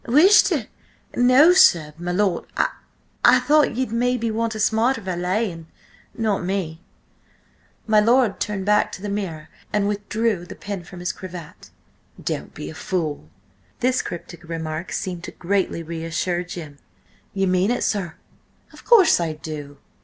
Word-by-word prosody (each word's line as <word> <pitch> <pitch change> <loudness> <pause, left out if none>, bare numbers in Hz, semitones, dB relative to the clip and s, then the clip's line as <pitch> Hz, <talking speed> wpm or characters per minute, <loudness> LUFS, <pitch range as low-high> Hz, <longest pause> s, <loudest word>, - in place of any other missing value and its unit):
"Wish 345 - +7
to—! - - -1 0.5
No, 255 +8 +6
sir–my 170 - +4
lord— 185 -1 0
I–I - - +1
thought 300 -4 +3
ye'd 255 -2 -2
maybe 235 -1 0
want 225 0 -1
a - - -5
smarter 225 +4 +2
valet–and–not 185 +2 -3
me." 175 -3 -3 1.0
My 215 -1 +4
lord 235 0 +3
turned 200 -2 -2
back 210 0 +3
to 190 - -8
the 205 - -3
mirror 185 -7 -4 0.2
and 205 -1 +1
withdrew 205 -2 -1
the - - -9
pin 200 -3 -6
from 175 +1 -11
his 180 +1 -1
cravat. 180 -5 -10 0.5
"Don't - - -4
be 75 - -6
a - - -10
fool." 155 - -3 0.5
This 255 +1 +2
cryptic 175 0 -8
remark 160 0 -5
seemed 175 -2 -4
greatly 185 -2 -1
to - - -16
reassure 170 +2 -2
Jim. 160 -5 -9 0.6
"Ye 195 0 +1
mean 185 +2 +2
it, 245 - 0
sir?" 185 -6 -1 0.6
"Of - - -15
course 390 - +6
I 165 -2 -1
do. 150 -2 -8
190 Hz, 145 wpm, -22 LUFS, 170-225 Hz, 1.0 s, Wish